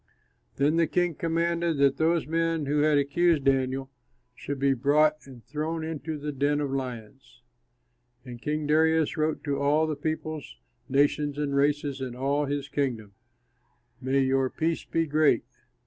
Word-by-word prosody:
Then 145 +4 +2
the 165 -1 +3
king 175 -1 +1
commanded 170 +1 0
that 140 -1 +3
those 165 +1 +2
men 165 0 0
who 145 +2 0
had 150 -1 +3
accused 150 +2 +2
Daniel 135 0 0 0.4
should 140 +3 -5
be 135 0 +2
brought 150 +4 +2
and 125 -4 -13
thrown 155 +3 -3
into 160 -1 -4
the 150 +1 -4
den 145 +1 0
of 145 -2 -2
lions. 130 -2 -7 0.8
And 120 -2 -9
King 150 +4 -2
Darius 160 +1 +2
wrote 155 0 -1
to 140 -2 -2
all 145 +3 +2
the 155 -1 -2
peoples, 155 - -4 0.3
nations, 145 +1 +1
and 145 -2 -1
races 140 -1 0
in 125 -2 -5
all 140 +3 0
his 140 0 -3
kingdom, 125 -8 -3 0.9
"May 135 +1 +1
your 135 0 +1
peace 165 +3 -2
be 165 0 0
great! 155 0 +3
145 Hz, 155 wpm, -27 LUFS, 135-155 Hz, 0.9 s, the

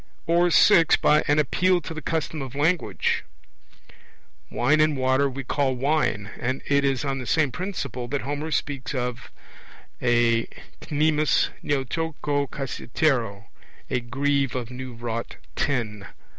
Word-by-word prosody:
Or 170 +1 +3
(6) 170 -2 +6
by 150 +1 +3
an 145 - +3
appeal 180 +5 +2
to 165 - -7
the 155 - -6
custom 160 -2 -2
of 135 -1 -7
language. 160 +5 0 1.3
Wine 150 +6 +2
and 155 -2 +2
water 130 +2 +2
we 135 +1 -6
call 135 0 0
'wine'; 125 -7 0
and 130 +2 -2
it 140 0 +2
is 135 0 0
on 135 -1 -1
the 125 - -6
same 155 -5 +2
principle 140 - -4
that 140 +2 -2
Homer 145 +3 -3
speaks 145 -3 -2
of 125 -1 -3 0.7
a 120 -1 +3 0.4
knemis 155 0 +2
neoteuktou 145 +1 -1
kassiteroio, 125 -5 -1 0.5
a 125 - +1
'greave 140 +2 0
of 125 -1 -4
new 125 -1 -7
wrought 115 0 -4 0.2
tin.' 110 -8 -2
140 Hz, 135 wpm, -25 LUFS, 125-150 Hz, 1.3 s, 6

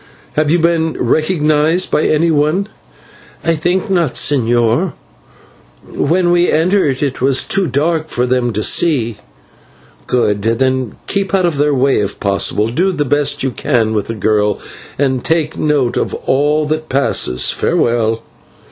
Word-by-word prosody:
Have 155 -1 0
you 170 - +4
been 165 -1 +1
recognised 155 +4 +1
by 150 - +2
anyone?" 155 +4 +1 0.8
"I 165 - +2
think 175 +6 -1
not, 175 -8 0
señor. 120 +4 +1 0.9
When 175 +1 0
we 175 0 +3
entered 160 -5 +1
it 135 -4 -3
was 130 0 +2
too 195 -2 0
dark 155 +4 0
for 125 - -1
them 125 -1 0
to 105 +1 -2
see." 120 -10 +1 0.9
"Good. 105 -5 0
Then 130 +2 0
keep 195 0 -1
out 185 -2 +2
of 160 -5 -1
their 145 0 +2
way 135 +1 +2
if 105 -1 -3
possible, 100 +2 0
do 175 +11 0
the 150 -5 -2
best 145 +1 0
you 135 - 0
can 115 -4 0
with 105 -2 -2
the 115 - -4
girl, 105 -1 +1 0.4
and 130 -3 0
take 160 -1 0
note 145 -5 0
of - - -2
all 150 +3 0
that 155 +1 -3
passes. 130 - +1
Farewell." 115 -1 0
145 Hz, 145 wpm, -15 LUFS, 120-165 Hz, 0.9 s, you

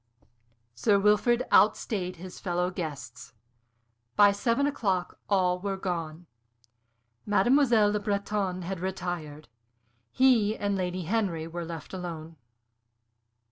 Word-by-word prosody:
Sir 200 - +2
Wilfrid 210 +5 +3
outstayed 195 -3 +2
his 180 +1 -10
fellow 180 0 -1
guests. 140 -9 -7 0.8
By 205 -1 +7
seven 230 +7 0
o'clock 195 -10 -1
all 180 -3 +2
were 195 0 -3
gone. 170 -3 -4 1.0
Mademoiselle 220 +1 +4
Le 210 - 0
Breton 200 -2 -2
had 185 +1 -4
retired. 175 -5 -5 0.6
He 225 - +3
and 200 -1 -1
Lady 185 -1 -2
Henry 180 -4 -1
were 170 +1 -5
left 165 0 -8
alone. 165 -3 -7
185 Hz, 105 wpm, -28 LUFS, 175-210 Hz, 1.0 s, By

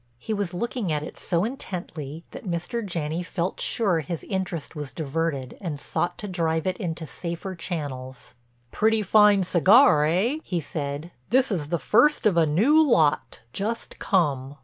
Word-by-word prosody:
He 220 - -4
was 200 -4 -1
looking 210 0 -2
at 150 -1 -1
it - - -8
so 170 -1 0
intently 170 - -5
that 190 - -7
Mr. 175 +7 -2
Janney 170 -3 -3
felt 180 0 -3
sure 195 -8 +2
his 160 +2 -5
interest 185 -6 -4
was 145 -3 -5
diverted 150 -3 -3
and 160 -7 -4
sought 175 +4 -2
to 210 - -6
drive 165 -4 -1
it 185 -1 -1
into 165 -4 -4
safer 170 +4 -5
channels. 140 -7 -6 0.4
"Pretty 220 0 +2
fine 205 0 +5
cigar, 185 - +5
eh?" 210 - +1
he 175 - -2
said. 145 +1 -5 0.2
"This 255 +2 +3
is 160 -7 -1
the 170 +3 0
first 230 - +3
of 205 -5 +4
a 165 -2 +4
new 235 - +4
lot, 165 - +2
just 225 +4 -3
come." 145 -7 0
175 Hz, 165 wpm, -25 LUFS, 155-205 Hz, 0.4 s, fine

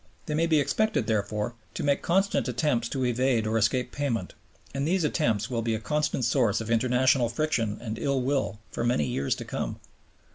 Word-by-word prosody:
They 155 - -3
may 165 +2 +2
be 160 -2 +4
expected, 215 +9 +1
therefore, 105 +1 -1 0.2
to - - -3
make 140 -1 +2
constant 190 - +1
attempts 120 -2 0
to 130 -2 -1
evade 125 -1 +1
or 110 +1 -1
escape 120 +3 +1
payment, 120 -10 -2 0.4
and 140 +1 -1
these 180 +1 +2
attempts 115 - +1
will 115 -2 0
be 115 0 0
a - - -3
constant 150 0 0
source 115 -4 +2
of 115 0 -4
international 125 +1 +3
friction 115 -6 -1
and 110 -2 -5
ill 140 -1 +1
will 135 -4 0
for - - -3
many 120 -11 +2
years 70 0 -1
to - - -7
come. - - -4
125 Hz, 190 wpm, -27 LUFS, 115-145 Hz, 0.4 s, be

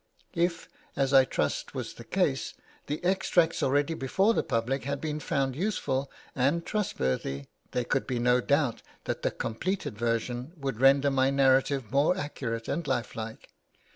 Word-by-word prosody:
If, 170 0 0 0.3
as 135 0 +1
I 135 -1 +8
trust - - -2
was - - -4
the - - -11
case, - - 0 0.3
the 150 +4 -3
extracts 180 -3 +2
already 145 +4 +2
before 190 - +2
the - - +2
public 125 +2 -1
had 140 +1 -2
been 155 0 -3
found 135 -3 -1
useful 140 -7 -1 0.3
and 140 +6 +1
trustworthy, 70 - -1 0.2
there 125 -1 -1
could 135 - 0
be 130 -2 -1
no 125 +1 +3
doubt 140 -3 +1 0.2
that - - -3
the - - +1
completed 150 - -3
version 120 +5 -2
would 135 -5 -4
render 140 +1 +5
my 135 0 +3
narrative 135 -3 +3
more 145 +7 +3
accurate 115 -8 -4
and 170 -3 -2
lifelike. 115 -2 -4
135 Hz, 155 wpm, -28 LUFS, 125-155 Hz, 0.3 s, I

